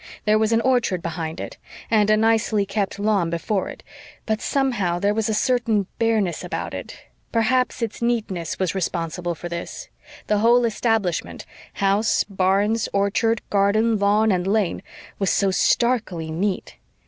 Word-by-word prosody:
There 215 0 +4
was 220 0 +1
an 225 0 +3
orchard 235 -8 +1
behind 165 -1 -4
it, - - -7 0.3
and 210 -2 +4
a 215 - +5
nicely 220 -2 +2
kept 200 0 -2
lawn 200 -4 +1
before 185 +4 -2
it, - - -10 0.4
but, 220 0 -1
somehow, 240 -11 0
there 200 +3 +1
was 220 +1 -1
a - - +1
certain 230 -4 +1
bareness 220 -6 +1
about - - -4
it. - - -7 0.3
Perhaps 245 +2 +1
its 225 0 -4
neatness 215 -8 -1
was 185 -3 -1
responsible 175 -1 -2
for 175 - -7
this; 170 0 -6 0.4
the 210 -1 +1
whole 235 +2 +4
establishment, 225 -5 -1 0.3
house, 200 +3 +2
barns, 200 +3 +1
orchard, 215 +3 +1
garden, 210 +2 +2
lawn 210 +2 +3
and 180 -1 0
lane, 205 -2 0 0.4
was 195 -2 +1
so 195 -1 +2
starkly 190 -6 +1
neat. 185 +4 -2
210 Hz, 150 wpm, -22 LUFS, 185-225 Hz, 0.4 s, a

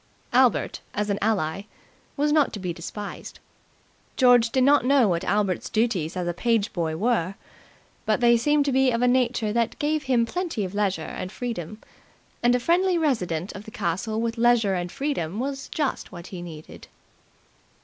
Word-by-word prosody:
Albert, 255 -1 +3 0.2
as 210 0 -1
an 200 - -1
ally, 195 -5 0 0.6
was 295 +1 +2
not 300 -2 +3
to - - -6
be 180 -2 -3
despised. 200 +5 -8 0.8
George 245 -3 +5
did 260 +2 +2
not 280 -1 +5
know 265 -2 +4
what 170 -3 0
Albert's 200 -3 0
duties 195 -7 0
as 180 -1 -2
a 175 - -1
page 225 +3 0
boy 160 -3 -2
were, 200 -3 0 0.7
but 215 +1 +2
they 240 -1 +5
seemed 295 +5 +2
to 280 - +1
be 265 0 +3
of 235 0 0
a - - +4
nature 245 -4 +1
that 235 -1 0
gave 305 +1 0
him 245 -3 +2
plenty 330 - -3
of 185 - -7
leisure 200 -5 0
and 185 +3 -6
freedom; 215 -4 -5 0.6
and 245 +1 +4
a - - +1
friendly 355 +6 +2
resident 190 - -1
of 200 - -9
the - - -9
castle 215 +3 -2
with 230 0 -2
leisure 230 -4 +3
and 175 -1 -3
freedom 210 - -3
was 270 +1 -4
just 295 -4 -2
what 175 -2 -9
he 180 - -6
needed. 160 -3 -10
225 Hz, 180 wpm, -25 LUFS, 185-255 Hz, 0.8 s, George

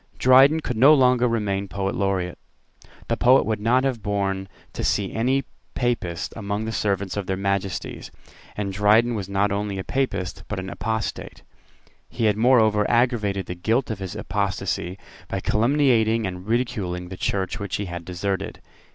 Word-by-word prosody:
Dryden 135 +5 +6
could 125 -6 -3
no 140 +6 +7
longer 125 -2 +4
remain 100 -4 -1
Poet 95 +1 -2
Laureate. 95 -3 -1 0.7
The - - +1
public 130 +2 +5
would 110 -1 -1
not 120 +5 +2
have 130 -5 -1
borne 100 -2 -1 0.3
to - - -4
see 100 -2 0
any 130 +4 +1 0.3
Papist 90 -9 -2
among 105 0 -3
the 110 - -3
servants 100 -3 -1
of 100 -3 -3
their 95 - -1
Majesties; 100 -1 -3 0.5
and 100 -2 -2
Dryden 105 +4 +4
was 100 -4 -4
not 100 +1 +1
only 100 -1 -2
a 95 - -3
Papist, 100 -9 -2
but 105 - -4
an 95 +1 -6
apostate. 110 -1 -4 0.7
He 115 - -2
had 105 -2 +3
moreover 110 -3 +3
aggravated 115 -5 +1
the - - -5
guilt 115 +8 0
of 105 - -5
his 95 -2 -6
apostasy 95 -2 -2 0.3
by - - -3
calumniating 115 -2 +2
and 90 0 -6
ridiculing 105 -7 -2
the 95 - -6
Church 95 0 -2
which 100 -2 -3
he 105 - -2
had 85 -1 -6
deserted. 95 +2 -3
105 Hz, 165 wpm, -23 LUFS, 95-120 Hz, 0.7 s, no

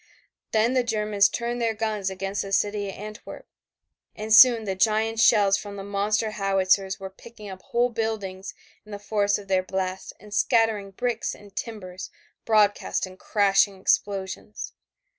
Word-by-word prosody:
Then 225 +3 +2
the 255 -1 +2
Germans 210 -3 +2
turned 240 0 -3
their 225 -1 0
guns 215 -3 -2
against 195 +1 -3
the 195 - -6
city 205 0 0
of - - -7
Antwerp 215 +2 -9 0.7
and 215 0 -2
soon 230 0 +8
the 195 -2 -2
giant 220 +3 +1
shells 205 -3 +5
from 205 -1 -8
the 195 - -7
monster 205 +2 -1
howitzers 195 -1 +1
were 190 0 -7
picking 215 +1 -13
up 185 0 -10
whole 240 +4 0
buildings 210 -4 -4 0.3
in 215 - -15
the - - -4
force 205 0 0
of 205 -1 -11
their 190 -1 +2
blast 185 0 -4
and 210 +1 -13
scattering 220 -3 +2
bricks 235 +3 -3
and 200 -1 -17
timbers 185 -5 -6 0.4
broadcast 210 -3 +2
in 185 0 -12
crashing 200 -1 +2
explosions. 195 +1 -2
205 Hz, 160 wpm, -25 LUFS, 195-220 Hz, 0.7 s, soon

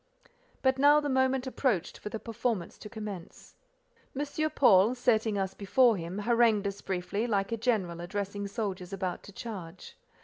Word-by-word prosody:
But 260 0 +3
now 290 +2 +7
the 295 -1 -2
moment 260 0 +2
approached 255 - -1
for - - -6
the 220 - -4
performance 230 -5 -3
to 210 - -9
commence. 205 -5 -8 0.7
M. 295 - 0 0.2
Paul, 230 -6 +5
setting 220 -4 +1
us 190 -1 -1
before 230 +4 +3
him, 175 +1 -5
harangued 225 -1 +3
us 200 0 -3
briefly, 195 +4 -2
like 200 -2 0
a 230 - -1
general 205 -8 0
addressing 200 +2 -4
soldiers 195 -3 -4
about 185 -2 -3
to - - -12
charge. 190 -5 -8
210 Hz, 160 wpm, -29 LUFS, 190-240 Hz, 0.7 s, now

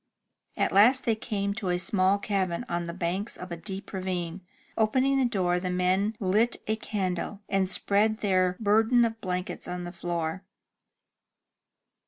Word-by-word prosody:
At - - +1
last 245 +7 +5
they 230 - +3
came 200 -2 -2
to 200 -3 -4
a 180 - +2
small 190 +1 +2
cabin 195 +1 -1
on 175 -3 -2
the 170 - -5
banks 185 +5 -3
of 180 0 -8
a - - -2
deep 190 +4 -7
ravine. 185 -2 -3 0.3
Opening 260 +5 +2
the 260 - +3
door, 185 -7 +1
the 180 0 -3
men 185 +4 +1
lit 215 +5 +2
a 220 - +1
candle, 200 -1 -3
and 195 -2 +1
spread 210 +3 +2
their 185 -3 +2
burden 225 +3 +4
of 225 0 -4
blankets 180 -1 -3
on 180 0 -4
the 175 - -6
floor. 170 0 -3
195 Hz, 160 wpm, -27 LUFS, 180-215 Hz, 0.3 s, last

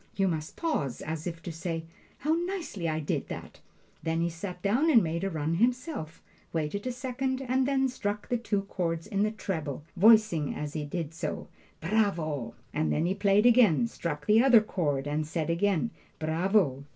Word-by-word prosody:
You 195 -1 +2
must 160 -3 -3
pause, 150 - -2
as 160 +2 -4
if 165 -1 -6
to 175 - -5
say, 165 0 -4 0.3
'How 305 +3 +1
nicely 340 - -2
I 155 0 -1
did 150 - -2
that!'" - - -8 0.4
Then 165 0 -1
he 170 0 0
sat 180 +2 -6
down 245 +11 +3
and 235 -8 +6
made 170 +2 -2
a 195 - 0
run 160 -2 -1
himself, 245 - -1 0.3
waited 165 +8 -2
a - - 0
second, 260 +1 -2
and 260 0 +1
then 270 -1 +2
struck 210 -5 -3
the 245 - +1
two 205 -4 -1
chords 170 -4 -2
in 200 -2 -1
the 215 - +3
treble, 160 -10 -4 0.3
saying 170 -9 -3
as 150 0 -4
he 150 -2 -3
did 165 +1 -4
so, 165 - -4 0.3
"Bravo!" 160 - 0 0.2
and 155 +1 0
then 155 - +1
he 180 - +1
played 200 +2 +3
again, 235 -5 +6
struck 150 -9 -4
the 215 +2 +6
other 250 -4 +7
chord 145 -10 -1
and 150 +1 -1
said 165 0 -1
again, 200 +4 +1 0.3
"Bravo!" 160 -3 +1
180 Hz, 185 wpm, -29 LUFS, 160-225 Hz, 0.4 s, other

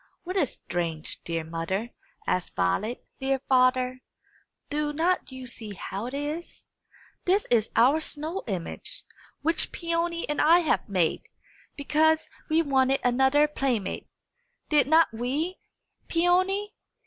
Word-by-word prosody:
"What 365 +2 -5
is 310 -10 +2
strange, 165 -3 -3
dear 165 -1 -2
mother?" 170 +8 -3 0.3
asked 180 - -1
Violet. 200 - 0
"Dear 270 0 +1
father, 255 0 +3 0.7
do 295 0 0
not 340 +1 0
you 260 0 -8
see 220 -4 -7
how 200 +4 -5
it 255 - -5
is? 300 +4 -5 0.6
This 390 +3 +3
is 225 -3 +3
our 260 +7 +5
snow 315 +4 -3
image, 185 -6 -4 0.4
which 330 +2 +1
Peony 335 0 -1
and 295 - 0
I 335 +3 +6
have 315 - 0
made, 180 -5 +1 0.5
because 310 +2 +2 0.2
we 320 +1 +3
wanted 270 -2 +2
another 265 +4 +4
playmate. 260 -9 -2 0.6
Did 295 -3 +4
not 320 -3 +5
we, 280 +11 -2 0.5
Peony?" 370 +4 +2
275 Hz, 125 wpm, -27 LUFS, 230-325 Hz, 0.7 s, I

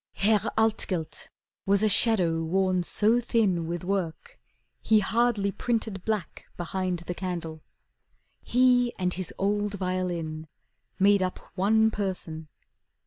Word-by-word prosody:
Herr 210 0 +1
Altgelt 205 -7 -1 0.4
was 200 +1 +3
a - - +4
shadow 195 -6 +4
worn 185 +2 +1
so 215 +6 +2
thin 210 -8 0
With 175 +1 -4
work, 195 - -4 0.4
he 220 - +3
hardly 215 -1 +1
printed 220 -3 -3
black 215 -6 -4
behind 180 +1 -2
The 175 - -3
candle. 170 -4 -5 0.8
He 245 -1 +2
and 180 -1 -1
his 185 -2 -3
old 205 +1 -1
violin 175 -4 -3 0.5
Made 200 +1 +4
up 185 -1 -2 0.2
one 220 +4 +2
person. 180 -6 -4
195 Hz, 120 wpm, -26 LUFS, 175-220 Hz, 0.8 s, a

